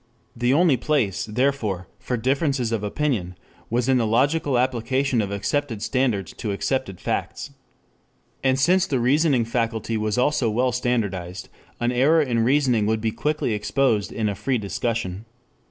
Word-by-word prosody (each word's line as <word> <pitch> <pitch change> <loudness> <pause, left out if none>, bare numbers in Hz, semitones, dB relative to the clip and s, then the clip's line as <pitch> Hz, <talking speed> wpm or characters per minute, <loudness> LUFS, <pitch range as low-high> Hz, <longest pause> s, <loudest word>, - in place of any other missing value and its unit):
The 120 +1 +1
only 155 -1 +4
place, 105 -11 0
therefore, 110 -5 -1
for 125 0 -2
differences 135 0 0
of 110 -3 -1
opinion 105 -6 -2 0.3
was 120 +2 0
in 130 -1 +3
the 115 - +1
logical 135 +4 +2
application 130 +1 +1
of 100 - -3
accepted 110 +3 -2
standards 110 -6 0
to 105 - -3
accepted 100 -1 -2
facts. - - -3 0.9
And 130 -1 +3
since 180 +6 +3
the 135 - 0
reasoning 135 0 +3
faculty 115 -1 -1
was 110 0 -1
also 125 -2 +2
well 125 +4 +1
standardized, 100 -8 -2 0.3
an 120 0 +1
error 140 +7 +4
in 120 -4 0
reasoning 125 -4 +2
would 110 0 +1
be 110 0 -1
quickly 150 -2 -1
exposed 110 0 0
in 110 -2 -1
a 100 - -1
free 125 +7 -1
discussion. 110 -1 -3
120 Hz, 155 wpm, -23 LUFS, 105-135 Hz, 0.9 s, only